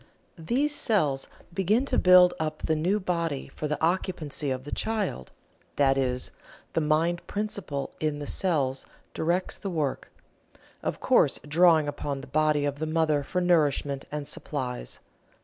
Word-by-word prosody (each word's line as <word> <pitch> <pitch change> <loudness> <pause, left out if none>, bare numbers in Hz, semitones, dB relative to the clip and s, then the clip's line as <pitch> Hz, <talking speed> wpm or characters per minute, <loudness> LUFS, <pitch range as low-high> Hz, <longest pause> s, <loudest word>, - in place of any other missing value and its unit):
These 265 - 0
cells 155 - +1 0.3
begin 200 +8 +2
to - - +1
build 180 -1 +7
up 155 -1 -3
the 160 - +1
new 180 +7 +1
body 170 -8 -2
for 150 - -4
the 150 - -2
occupancy 160 -4 -1
of 130 -1 -2
the 145 - -8
child 210 - -2 0.5
that 135 -1 +4
is, 125 -2 -1 0.4
the 165 - +1
mind 160 +3 +1
principle 200 -9 -3
in 155 -2 -1
the 145 - -5
cells 140 -7 -1 0.3
directs 175 +3 0
the 200 - -4
work, 155 -6 -2 0.7
of - - -3
course - - +3
drawing 160 0 +5
upon 145 -1 -3
the - - -9
body 150 +1 +2
of 145 0 -2
the 155 - -2
mother 155 -2 +2
for 180 +6 -2
nourishment 145 -5 +1
and 150 -1 -4
supplies. 125 - -5
155 Hz, 150 wpm, -27 LUFS, 145-180 Hz, 0.7 s, build